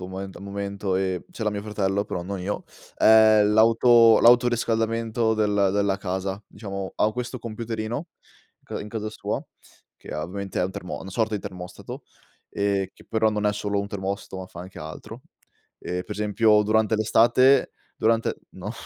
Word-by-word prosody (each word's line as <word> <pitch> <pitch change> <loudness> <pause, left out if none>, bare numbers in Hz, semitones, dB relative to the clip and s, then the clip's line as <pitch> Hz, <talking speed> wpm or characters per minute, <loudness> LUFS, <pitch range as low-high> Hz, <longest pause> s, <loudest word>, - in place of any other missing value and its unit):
al 95 +1 -7
momento, 100 -1 -3
e 95 -2 -1
ce 110 - -5
l'ha 105 - +1
mio 100 -1 -4
fratello, 100 -2 -1
però 90 - -4
non 95 +1 -5
io, 100 +3 -3 0.3
è 110 -1 +6
l'auto 115 +2 +6
l'autoriscaldamento 115 -1 +2
del 105 -2 +2
della 100 -1 +1
casa, 95 +1 -4
diciamo. 100 -2 -6
Ha 105 - +2
questo 125 +1 -4
computerino 115 +4 -4 0.7
in 105 - -7
casa 110 0 -4
sua - - -4 0.5
che, - - -10
ovviamente, 95 +6 -4
è - - +2
un 95 - -4
termo 90 - -6
una 95 - -8
sorta 110 +2 0
di - - -6
termostato 90 -1 -8 0.5
e 100 -2 -1
che, - - -19
però, 110 0 +2
non 105 -1 -1
è 105 - +2
solo 105 0 -2
un 100 - -2
termostato, 100 -1 -5
ma - - -9
fa 85 - -12
anche 95 0 -10
altro. 80 0 -9 0.6
E, 90 0 -4
per - - -21
esempio, 105 +1 +3
durante 110 +1 +2
l'estate, 120 +5 +4 0.3
durante 115 0 +1 0.2
No, - - -7
105 Hz, 160 wpm, -24 LUFS, 95-110 Hz, 0.7 s, è